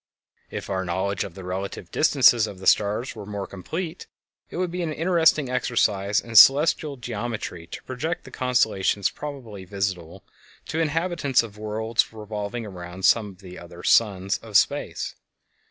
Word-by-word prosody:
If - - -6
our 95 -1 -2
knowledge 95 +2 -1
of 85 - -9
the 95 - -9
relative 95 -1 -5
distances 125 -7 +5
of 100 - -8
the 95 - -10
stars 105 +6 +2
were 105 - -8
more 100 -1 -4
complete, 160 - -6 0.4
it - - -7
would 180 -1 -1
be 180 +1 -3
an 165 -2 -2
interesting 160 -3 +3
exercise 105 -5 +1
in 115 -1 -9
celestial 145 +3 +6
geometry 115 -8 -5
to - - -9
project 150 +7 -4
the - - -13
constellations 110 -6 +1
probably 125 -10 -8
visible 95 -2 -4 0.5
to - - -3
the - - +2
inhabitants 160 -4 +1
of 105 -3 -10
worlds 110 +2 -1
revolving 110 +1 -5
around 90 -1 -6
some 110 -3 +4
of 95 0 -15
the 90 -2 -10
other 85 0 -12
suns 100 -3 +2
of - - +1
space. - - 0
110 Hz, 160 wpm, -24 LUFS, 95-135 Hz, 0.5 s, celestial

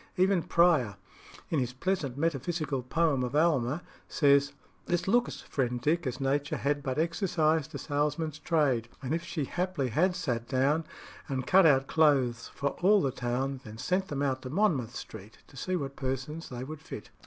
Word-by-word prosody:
Even 185 0 +3
Prior, 160 - +3 0.6
in 160 - +2
his 125 -1 -2
pleasant 140 -3 -2
metaphysical 155 -2 -1
poem 140 +1 +1
of 125 +3 -3
"Alma," 150 -1 +2 0.3
says 140 -1 +4 0.4
"This 175 +1 0
looks, 240 +4 +1
friend 125 -3 -2
Dick, 155 +5 +1
as 125 - -3
Nature 140 +1 0
had 145 +1 0
But 130 -1 -3
exercised 160 -2 +1
the - - -5
salesman's 150 +1 -1
trade, 145 -8 +1
As 130 - -3
if 165 +1 0
she 155 -6 -3
haply 175 -5 -2
had 175 - +2
sat 120 -7 -2
down 140 +5 +1 0.4
And 130 -3 -2
cut 190 +2 +6
out 135 -3 +4
clothes 135 -7 +2
for 140 - -2
all 205 +3 +6
the 135 - +1
town, 130 +2 -2
Then 110 -1 -10
sent 185 +10 0
them 145 -5 -2
out 130 -2 0
to 130 - -7
Monmouth 145 - +1
Street, 110 0 -9
To - - -17
try 185 +8 -2
what 140 -5 -3
persons 135 +5 -4
they 125 0 -6
would 155 +2 -8
fit." 110 -9 -9
145 Hz, 175 wpm, -29 LUFS, 130-165 Hz, 0.6 s, cut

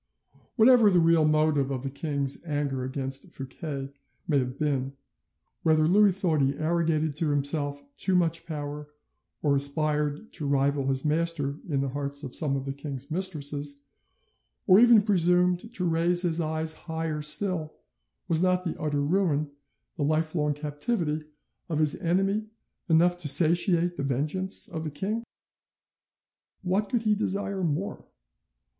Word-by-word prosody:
Whatever 230 -2 +6
the 185 - +3
real 165 -1 +4
motive 155 -2 +2
of 135 -2 -4
the 135 - -3
king's 140 -1 -3
anger 145 -5 -2
against 135 +1 -4
Fouquet 135 0 -6 0.3
may 145 -4 +2
have 125 0 -3
been, 135 -3 -1 0.7
whether 155 -1 +3
Louis 195 +1 +4
thought 160 -6 +1
he 135 +1 +1
arrogated 160 -2 0
to 155 -1 +1
himself 145 0 -1
too 190 - +1
much 170 -1 +1
power, 150 -1 -5 0.6
or 145 -2 +3
aspired 150 +5 -1
to 150 -4 -4
rival 140 0 +1
his 135 +1 -1
master 155 -2 0
in 140 -3 0
the 135 - -2
hearts 140 +1 -4
of 130 - -7
some 145 -3 +1
of 135 -1 -4
the 135 - -3
king's 140 0 -8
mistresses, 145 -5 -2 0.8
or 190 0 +7
even 235 -3 +7
presumed 180 0 +2
to 185 -6 -3
raise 170 +2 +2
his 170 -1 +1
eyes 160 0 0
higher 160 -2 -4
still, 155 +1 -1 0.5
was 165 -2 +1
not 185 0 +2
the 170 - -3
utter 145 -2 -1
ruin, 155 -2 0 0.5
the 150 - -1
lifelong 155 0 0
captivity, 150 +1 -3 0.4
of 160 - -1
his 155 -1 +3
enemy 195 +5 0 0.4
enough 175 +2 +3
to 160 - -2
satiate 170 +3 +4
the 140 - -3
vengeance 150 +8 -1
of 160 -2 -6
the 155 - -3
king? 205 +10 -3 1.4
What 195 +3 0
could 240 -2 0
he 215 -1 +3
desire 200 -2 -2
more? 170 +6 -2
155 Hz, 150 wpm, -27 LUFS, 145-175 Hz, 1.4 s, or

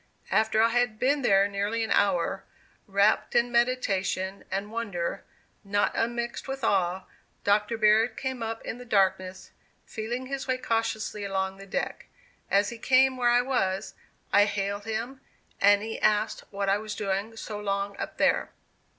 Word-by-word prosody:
After 220 0 +3
I 230 - +4
had 240 -2 +1
been 280 +5 +1
there 195 -5 +4
nearly 205 +3 -1
an 220 - -3
hour, 195 -1 +1 0.4
wrapt 200 +3 +2
in 240 0 +3
meditation 200 -6 0
and 200 +2 -3
wonder, 205 -7 -3 0.4
not 205 0 +1
unmixed 235 +2 -2
with 270 -1 -5
awe, 185 -3 +1 0.4
Dr. 210 +3 +2
Baird 220 +1 +3
came 260 -2 -3
up 225 0 -4
in 235 - -5
the - - -8
darkness, 190 -4 0 0.3
feeling 240 +3 -4
his 275 +1 -5
way 255 -1 +1
cautiously 225 -3 -2
along 190 -1 -2
the 195 0 -12
deck. 275 +8 -3 0.4
As 200 +1 +3
he 235 - -8
came 260 +2 +4
where 245 -1 +2
I 245 +1 +4
was, 195 -7 -1 0.4
I 205 0 +7
hailed 205 0 -3
him; 230 +4 -4 0.4
and 205 +1 +5
he 225 0 -5
asked 215 +1 +1
what 200 0 -3
I 195 +1 +3
was 215 -1 -6
doing 200 +3 -3
so 210 -2 -6
long 200 0 -2
up - - -6
there. - - +2
215 Hz, 160 wpm, -27 LUFS, 200-235 Hz, 0.4 s, I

